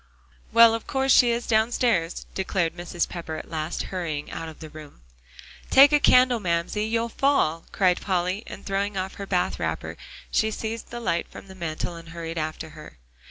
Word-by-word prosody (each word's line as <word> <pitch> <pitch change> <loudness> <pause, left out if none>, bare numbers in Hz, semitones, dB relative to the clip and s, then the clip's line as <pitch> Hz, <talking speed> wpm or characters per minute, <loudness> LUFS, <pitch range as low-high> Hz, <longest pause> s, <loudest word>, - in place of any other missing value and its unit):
"Well, 230 -1 +7
of 225 - -4
course 265 0 +1
she 245 -1 +6
is 235 +1 -1
downstairs," 220 -6 +1
declared 190 -3 -1
Mrs. 175 -1 -2
Pepper 165 -2 -6
at - - -8
last, 160 +1 -3
hurrying 160 -5 -3
out 165 0 -5
of 155 - -13
the 155 -2 -10
room. 150 - -12 0.7
"Take 275 +2 +8
a 295 - +6
candle, 250 -3 +5
Mamsie, 175 +3 -1
you'll 230 +1 0
fall," 230 - +1
cried 185 -2 +2
Polly, 185 +1 -1
and - - -9
throwing 195 0 -1
on 190 0 -2
her 200 - -8
bath 180 -2 0
wrapper, - - -3 0.3
she 220 - +2
seized 220 +1 -5
the 240 - -6
light 170 -7 -1
from - - -12
the - - -9
mantel 170 -1 -4
and 165 0 -11
hurried 165 0 -5
after 155 +1 -4
her. 155 - -13
185 Hz, 185 wpm, -25 LUFS, 165-225 Hz, 0.7 s, Take